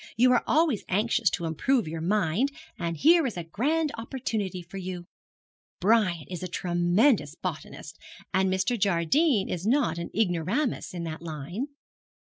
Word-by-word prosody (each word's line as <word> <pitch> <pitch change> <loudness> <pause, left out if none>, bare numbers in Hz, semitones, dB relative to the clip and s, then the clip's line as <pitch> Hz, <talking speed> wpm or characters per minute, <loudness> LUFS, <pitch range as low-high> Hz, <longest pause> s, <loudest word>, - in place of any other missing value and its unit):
You 250 +2 +5
are 245 - +3
always 310 - +2
anxious 220 +2 +2
to 170 - -3
improve 225 - +1
your 160 +1 -4
mind, 205 - +1 0.3
and 170 -1 -2
here 325 - +5
is 225 - -5
a 175 - -3
grand 290 - 0
opportunity 220 -7 -3
for 175 +3 -10
you. 180 -2 -5 0.7
Brian 185 -5 +2
is 180 -3 -6
a 185 - -3
tremendous 175 - +2
botanist, 160 -2 -7 0.3
and 190 0 +2
Mr. 200 +6 0
Jardine 200 - +2
is 180 +3 -3
not 240 - +2
an 170 - -5
ignoramus 205 - 0
in 170 - -4
that 160 -1 -5
line.' 170 - -5
190 Hz, 150 wpm, -27 LUFS, 170-240 Hz, 0.7 s, You